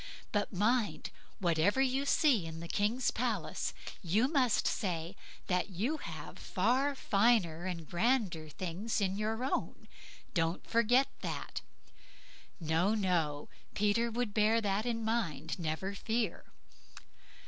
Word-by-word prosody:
But 205 Hz, -1 st, 0 dB
mind, 215 Hz, +3 st, +1 dB, 0.3 s
whatever 175 Hz, +6 st, +2 dB
you 270 Hz, +1 st, +2 dB
see 255 Hz, -, +3 dB
in 160 Hz, 0 st, -7 dB
the 170 Hz, -, -6 dB
king's 215 Hz, +8 st, +1 dB
palace, -, -, -1 dB, 0.3 s
you 210 Hz, +8 st, +2 dB
must 265 Hz, -6 st, +2 dB
say 175 Hz, -2 st, -1 dB, 0.5 s
you 220 Hz, -, -1 dB
have 160 Hz, -, -8 dB
far 255 Hz, +9 st, +1 dB
finer 200 Hz, -8 st, +2 dB
and 170 Hz, -4 st, -4 dB
grander 185 Hz, -6 st, +1 dB
things 185 Hz, +9 st, -3 dB
of 195 Hz, -2 st, 0 dB
your 220 Hz, +3 st, -2 dB
own. 265 Hz, -, -2 dB, 0.5 s
Don't 165 Hz, -1 st, 0 dB
forget 240 Hz, +4 st, +4 dB
that." -, -, -4 dB, 1.0 s
No, 165 Hz, +6 st, +2 dB
no, 170 Hz, -8 st, 0 dB, 0.3 s
Peter 210 Hz, +3 st, +2 dB
would 230 Hz, -2 st, -2 dB
bear 220 Hz, +1 st, +4 dB
that 210 Hz, +1 st, 0 dB
in 230 Hz, -2 st, -1 dB
mind, 165 Hz, -10 st, -1 dB
never 170 Hz, +4 st, -2 dB
fear. 220 Hz, -1 st, -2 dB
205 Hz, 120 wpm, -33 LUFS, 170-235 Hz, 1.0 s, forget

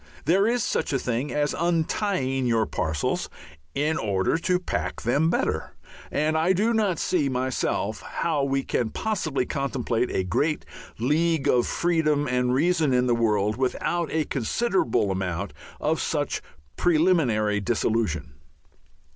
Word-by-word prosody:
There 190 Hz, +7 st, +4 dB
is 240 Hz, -1 st, +1 dB
such -, -, -1 dB
a -, -, +3 dB
thing 125 Hz, +2 st, -2 dB
as 145 Hz, 0 st, 0 dB
untying 165 Hz, -5 st, 0 dB
your 115 Hz, -2 st, +2 dB
parcels 80 Hz, -6 st, -2 dB, 0.5 s
in 155 Hz, +3 st, +1 dB
order 95 Hz, +1 st, +1 dB
to 180 Hz, +1 st, +1 dB
pack 180 Hz, -, -3 dB
them 145 Hz, +7 st, +2 dB
better, -, -, -1 dB, 0.4 s
and 155 Hz, +2 st, +1 dB
I 165 Hz, +4 st, +3 dB
do 215 Hz, +5 st, +2 dB
not 210 Hz, -6 st, +1 dB
see 150 Hz, -7 st, +1 dB
myself 125 Hz, -4 st, -1 dB
how 155 Hz, -4 st, -1 dB
we 135 Hz, 0 st, 0 dB
can 120 Hz, -3 st, -1 dB
possibly 155 Hz, -, -1 dB
contemplate 125 Hz, -4 st, -1 dB
a 95 Hz, -, 0 dB
great 145 Hz, -, 0 dB, 0.3 s
league 155 Hz, +5 st, +1 dB
of 120 Hz, -1 st, +3 dB
freedom 155 Hz, -4 st, +1 dB
and 125 Hz, -1 st, +1 dB
reason 155 Hz, 0 st, +2 dB
in 125 Hz, 0 st, +3 dB
the 120 Hz, -, +2 dB
world 105 Hz, -2 st, +1 dB
without 160 Hz, +6 st, -1 dB
a 155 Hz, -1 st, 0 dB
considerable 135 Hz, -, 0 dB
amount 95 Hz, 0 st, -3 dB, 0.3 s
of -, -, 0 dB
such -, -, -1 dB, 0.4 s
preliminary 155 Hz, -, +2 dB
dissolution. 110 Hz, -8 st, -1 dB
135 Hz, 140 wpm, -25 LUFS, 115-165 Hz, 0.5 s, There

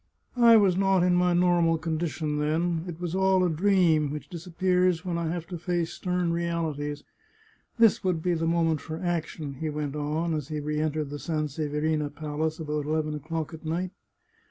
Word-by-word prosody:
I 230 Hz, -1 st, +8 dB
was 195 Hz, -4 st, +4 dB
not 195 Hz, -1 st, +3 dB
in 180 Hz, 0 st, +3 dB
my 180 Hz, 0 st, +3 dB
normal 175 Hz, -2 st, +3 dB
condition 155 Hz, -2 st, -2 dB
then. 165 Hz, +3 st, 0 dB
It 170 Hz, -2 st, -7 dB
was 175 Hz, -2 st, -3 dB
all 190 Hz, 0 st, +3 dB
a 180 Hz, -, +2 dB
dream, 165 Hz, -4 st, +3 dB
which 150 Hz, +6 st, -7 dB
disap 170 Hz, 0 st, -9 dB
pears 180 Hz, -1 st, +2 dB
when 175 Hz, -2 st, -2 dB
I 170 Hz, -, -2 dB
have 170 Hz, -1 st, -4 dB
to 175 Hz, -3 st, -5 dB
face 175 Hz, -1 st, -1 dB
stern 180 Hz, -2 st, -1 dB
realities. 160 Hz, -4 st, -2 dB, 0.7 s
This 230 Hz, -2 st, +4 dB
would 180 Hz, -4 st, 0 dB
be 180 Hz, -, +2 dB
the 165 Hz, -1 st, -1 dB
moment 165 Hz, -2 st, +1 dB
for 160 Hz, 0 st, -6 dB
action," 160 Hz, -5 st, -3 dB
he 160 Hz, -, -2 dB
went 150 Hz, -1 st, -3 dB
on, 155 Hz, +3 st, -1 dB
as 150 Hz, -4 st, -3 dB
he 155 Hz, -1 st, -3 dB
re 150 Hz, +1 st, -2 dB
entered 155 Hz, -2 st, -1 dB
the 145 Hz, -, -5 dB
Sanseverina 150 Hz, -1 st, -1 dB
Palace 155 Hz, +2 st, -3 dB
about 150 Hz, -2 st, -3 dB
eleven 155 Hz, 0 st, 0 dB
o'clock 155 Hz, +2 st, -4 dB
at 160 Hz, -, -9 dB
night. 175 Hz, +3 st, -2 dB
165 Hz, 185 wpm, -27 LUFS, 150-175 Hz, 0.7 s, I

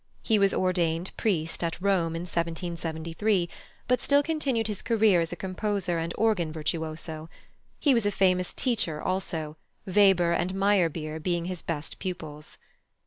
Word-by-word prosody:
He 220 Hz, -3 st, +3 dB
was 195 Hz, -1 st, +4 dB
ordained 175 Hz, -1 st, 0 dB
priest 165 Hz, -6 st, -1 dB
at 165 Hz, 0 st, -2 dB
Rome 180 Hz, -4 st, +1 dB
in 165 Hz, -, -3 dB
1773, 170 Hz, +2 st, -1 dB, 0.4 s
but 250 Hz, -1 st, +2 dB
still 285 Hz, 0 st, +4 dB
continued 280 Hz, -8 st, 0 dB
his 210 Hz, -2 st, -3 dB
career 220 Hz, -6 st, +4 dB
as 165 Hz, -, -2 dB
a -, -, -3 dB
composer 185 Hz, -1 st, -1 dB
and 165 Hz, +1 st, -2 dB
organ 205 Hz, -8 st, +2 dB
virtuoso. 155 Hz, 0 st, -4 dB, 0.5 s
He 285 Hz, -, +4 dB
was 230 Hz, -4 st, +2 dB
a -, -, +2 dB
famous 185 Hz, -2 st, +2 dB
teacher 210 Hz, -, 0 dB
also, 160 Hz, -5 st, -2 dB, 0.3 s
Weber 190 Hz, -3 st, +4 dB
and 175 Hz, +2 st, 0 dB
Meyerbeer 170 Hz, -6 st, +1 dB
being 170 Hz, +1 st, -1 dB
his 180 Hz, -1 st, -4 dB
best 160 Hz, -2 st, -5 dB
pupils. 160 Hz, -5 st, -6 dB
180 Hz, 145 wpm, -27 LUFS, 165-200 Hz, 0.5 s, was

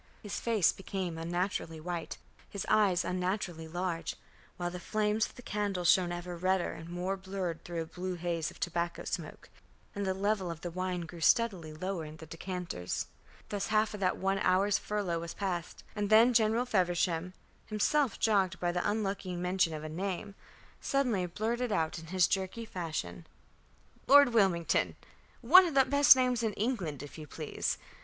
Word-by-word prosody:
His 205 Hz, -, -4 dB
face 220 Hz, -6 st, +3 dB
became 185 Hz, -3 st, -4 dB
unnaturally 170 Hz, -1 st, -2 dB
white, 170 Hz, +1 st, -4 dB, 0.3 s
his 200 Hz, -, -5 dB
eyes 200 Hz, -5 st, +3 dB
unnaturally 180 Hz, -3 st, -2 dB
large, 175 Hz, 0 st, -3 dB, 0.4 s
while 175 Hz, 0 st, -2 dB
the 180 Hz, -, -6 dB
flames 215 Hz, +3 st, 0 dB
of -, -, -17 dB
the 245 Hz, -, -12 dB
candles 200 Hz, -5 st, -1 dB
shone 180 Hz, -2 st, +2 dB
ever 175 Hz, 0 st, -5 dB
redder 185 Hz, +1 st, +1 dB
and 165 Hz, +1 st, -9 dB
more 180 Hz, +2 st, -2 dB
blurred 190 Hz, -3 st, -4 dB
through 170 Hz, -1 st, -3 dB
a -, -, -9 dB
blue 180 Hz, +3 st, -5 dB
haze 170 Hz, -2 st, -2 dB
of -, -, -14 dB
tobacco 175 Hz, 0 st, -2 dB
smoke, -, -, -5 dB, 0.5 s
and 200 Hz, -, -3 dB
the 190 Hz, -1 st, 0 dB
level 200 Hz, -1 st, 0 dB
of 165 Hz, -1 st, -6 dB
the 175 Hz, -, -5 dB
wine 185 Hz, 0 st, -2 dB
grew 170 Hz, 0 st, -9 dB
steadily 185 Hz, -5 st, +2 dB
lower 180 Hz, +2 st, -4 dB
in 155 Hz, 0 st, -9 dB
the 160 Hz, -, -10 dB
decanters. 165 Hz, -, -4 dB, 0.4 s
Thus 205 Hz, -1 st, -2 dB
half 215 Hz, 0 st, +2 dB
of 210 Hz, -, -6 dB
that 185 Hz, -2 st, +1 dB
one 195 Hz, +1 st, 0 dB
hour's 195 Hz, +2 st, +3 dB
furlough 200 Hz, -5 st, -2 dB
was 170 Hz, 0 st, -6 dB
passed; 180 Hz, -4 st, -4 dB
and 205 Hz, -1 st, -1 dB
then 225 Hz, +3 st, +6 dB
General 225 Hz, +1 st, +3 dB
Feversham, 180 Hz, -4 st, 0 dB, 0.3 s
himself 230 Hz, +4 st, +1 dB
jogged 195 Hz, -4 st, +2 dB
by 175 Hz, -1 st, 0 dB
the 180 Hz, +2 st, 0 dB
unlucky 200 Hz, -3 st, -2 dB
mention 180 Hz, -1 st, +1 dB
of 155 Hz, -1 st, -5 dB
a -, -, -4 dB
name, 185 Hz, +4 st, -4 dB, 0.5 s
suddenly 240 Hz, -10 st, 0 dB
blurted 230 Hz, +6 st, -2 dB
out 165 Hz, -4 st, 0 dB
in 165 Hz, -, -11 dB
his 180 Hz, 0 st, +3 dB
jerky 195 Hz, +4 st, -2 dB
fashion: 155 Hz, -, -5 dB, 0.8 s
"Lord 285 Hz, -1 st, +8 dB
Wilmington. 190 Hz, -7 st, +2 dB, 0.5 s
One 355 Hz, +10 st, +8 dB
of 315 Hz, -, -4 dB
the 270 Hz, -1 st, +6 dB
best 285 Hz, 0 st, +7 dB
names 250 Hz, -2 st, +1 dB
in 220 Hz, -2 st, 0 dB
England, 190 Hz, -, -2 dB
if 145 Hz, +2 st, -10 dB
you 155 Hz, -, -8 dB
please. 155 Hz, 0 st, -3 dB
185 Hz, 175 wpm, -31 LUFS, 170-210 Hz, 0.8 s, Lord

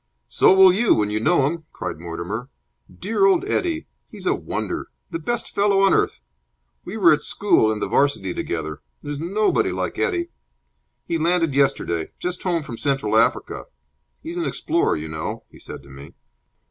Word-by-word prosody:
"So -, -, +4 dB
will 190 Hz, -1 st, +8 dB
you, 220 Hz, +4 st, +3 dB
when 105 Hz, -1 st, 0 dB
you 105 Hz, -, 0 dB
know 140 Hz, +4 st, +3 dB
him," 160 Hz, +2 st, -3 dB
cried 90 Hz, -3 st, -5 dB
Mortimer. 85 Hz, +9 st, -5 dB, 0.4 s
"Dear 225 Hz, -, +1 dB
old 380 Hz, 0 st, +2 dB
Eddie! 335 Hz, -5 st, -1 dB, 0.2 s
He's -, -, -9 dB
a -, -, +3 dB
wonder! -, -, -4 dB, 0.2 s
The 335 Hz, -, -3 dB
best 240 Hz, -5 st, -3 dB
fellow 200 Hz, -1 st, +3 dB
on 195 Hz, -, +5 dB
earth! -, -, 0 dB, 0.6 s
We 195 Hz, +5 st, -6 dB
were 170 Hz, -6 st, +6 dB
at 150 Hz, -, 0 dB
school 170 Hz, -, +2 dB
and 110 Hz, -, -3 dB
the -, -, -1 dB
'Varsity 140 Hz, -10 st, +1 dB
together. 80 Hz, -4 st, -4 dB, 0.2 s
There's 145 Hz, -1 st, -5 dB
nobody 195 Hz, +7 st, +1 dB
like -, -, -3 dB
Eddie! 345 Hz, -2 st, 0 dB, 0.8 s
He 165 Hz, -1 st, -1 dB
landed 165 Hz, -2 st, +1 dB
yesterday. 110 Hz, -, 0 dB
Just 180 Hz, 0 st, -4 dB
home 175 Hz, -4 st, -1 dB
from 115 Hz, -5 st, -8 dB
Central 135 Hz, -7 st, 0 dB
Africa. 115 Hz, +2 st, +1 dB, 0.6 s
He's 335 Hz, +2 st, -5 dB
an 340 Hz, -, -1 dB
explorer, 340 Hz, -, 0 dB
you 75 Hz, +1 st, -5 dB
know," 80 Hz, 0 st, -5 dB
he -, -, -16 dB
said -, -, -9 dB
to 70 Hz, -, -16 dB
me. 70 Hz, +1 st, -12 dB
160 Hz, 175 wpm, -22 LUFS, -, 0.8 s, will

